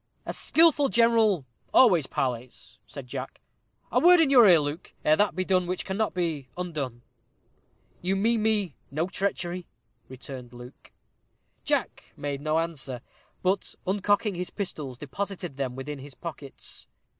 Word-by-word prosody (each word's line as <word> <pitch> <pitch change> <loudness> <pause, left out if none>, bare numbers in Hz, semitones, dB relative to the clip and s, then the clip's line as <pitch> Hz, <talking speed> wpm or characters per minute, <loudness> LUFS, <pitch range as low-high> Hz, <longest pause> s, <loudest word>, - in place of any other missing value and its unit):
"A - - -4
skilful 315 -4 +4
general 225 - +3 0.3
always 180 - +6
parleys," 125 -1 -4
said 140 -3 -8
Jack. 130 +1 -6 0.5
"A - - +4
word 355 0 +7
in 310 -4 +4
your 245 -5 +8
ear, 170 -3 +7
Luke, 145 +3 -4
ere 155 - +6
that 205 -1 +2
be 185 0 -1
done 185 -2 +2
which 180 +1 -2
cannot 200 +2 -1
be 160 -7 -2
undone." 145 -9 -4 1.0
"You 185 +2 0
mean 225 +3 +2
me 210 -7 +2 0.2
no 155 +5 -1
treachery?" 180 -2 -3 0.4
returned 130 -1 -9
Luke. 120 +1 -13 0.7
Jack - - -2
made 145 -1 -4
no 155 +1 +1
answer, 145 -7 -2 0.4
but 190 +2 0
uncocking 205 +2 +1
his 180 0 -4
pistols, 150 - -5
deposited 175 +2 -5
them 130 -3 -2
within 140 +2 -6
his 135 0 -11
pockets. 150 -5 -7
175 Hz, 145 wpm, -27 LUFS, 140-200 Hz, 1.0 s, your